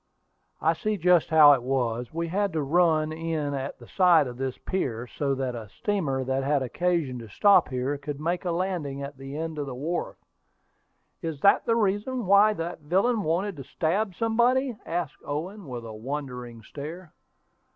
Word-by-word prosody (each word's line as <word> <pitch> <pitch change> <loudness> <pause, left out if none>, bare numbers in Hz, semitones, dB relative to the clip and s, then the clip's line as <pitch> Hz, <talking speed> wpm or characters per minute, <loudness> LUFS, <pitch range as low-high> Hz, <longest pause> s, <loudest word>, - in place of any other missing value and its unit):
"I 160 - +4
see 210 +6 -2
just 175 -1 +3
how 155 -2 +8
it 135 - +1
was: 125 -2 -1
we 170 +1 -2
had 200 +1 0
to 155 -2 0
run 155 0 +2
in 160 -2 -2
at 135 0 -4
the - - -14
side 175 -5 +5
of 125 -1 -6
this 130 -1 -3
pier, 125 -11 -3
so 140 +2 -2
that 130 -2 -2
a 115 -3 -7
steamer 150 - -1
that 135 +1 -1
had 140 0 +1
occasion 155 -1 -1
to 115 -2 -10
stop 200 - +5
here 130 +2 -2
could 145 0 -6
make 170 +3 -1
a 180 - -2
landing 170 -6 -2
at 140 0 -7
the 135 +2 -7
end 160 -1 -4
of 145 - -3
the 130 - -5
wharf." 165 +7 -3 1.0
"Is 160 -5 -4
that 200 - +4
the 230 - +3
reason 215 +3 0
why 200 +3 +6
that 170 -2 -5
villain 195 +10 +1
wanted 180 +2 -1
to 135 - -7
stab 180 - -1
somebody?" 240 +4 +2
asked 165 -3 -3
Owen, 175 +6 -5
with 120 -3 -6
a 110 - -7
wondering 125 -1 -6
stare. 155 - -8
155 Hz, 185 wpm, -26 LUFS, 135-185 Hz, 1.0 s, how